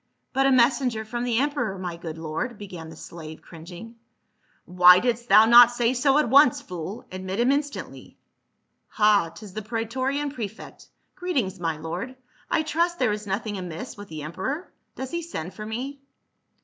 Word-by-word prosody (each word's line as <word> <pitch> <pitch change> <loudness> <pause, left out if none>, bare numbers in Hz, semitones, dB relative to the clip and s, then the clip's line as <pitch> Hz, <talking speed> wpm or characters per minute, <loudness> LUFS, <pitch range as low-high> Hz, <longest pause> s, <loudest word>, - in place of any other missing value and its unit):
" - - -50
But 270 0 +3
a - - +4
messenger 240 -2 +2
from 240 +2 -3
the 240 -2 0
emperor, 255 -7 -1
my 180 -2 -5
good 165 -1 -7
lord," 165 +10 -4
began 180 -6 -9
the 160 - -11
slave 160 -1 -10
cringing, 175 +8 -11 0.4
*' - - -39
Why 180 0 +7
didst 240 +2 -1
thou 215 +3 +8
not 240 +1 +9
say 240 0 +1
so 270 +2 +3
at 300 - +3
once, 270 +1 +6
fool. 180 +4 -7
Admit 185 +2 -5
him 245 +3 +3
instantly. 285 0 -4 0.7
Ha, 210 -5 +3
'tis 190 +4 -12
the 215 - -4
praetorian 255 +6 -2
prefect. 220 -5 -8 0.3
Greet 360 -3 -4
ings, 190 -6 -1
my 165 -3 -2
lord; 175 +11 -5 0.3
I 315 - +1
trust 340 +3 0
there 250 -7 +2
is 210 0 -4
nothing 205 +1 -3
amiss 180 +5 -7
with 205 0 -10
the 155 -4 -7
emperor; 260 - -4 0.2
does 265 0 -6
he 340 - -2
send 190 - -6
for 215 0 -8
me 265 +5 -5
220 Hz, 180 wpm, -25 LUFS, 180-260 Hz, 0.7 s, not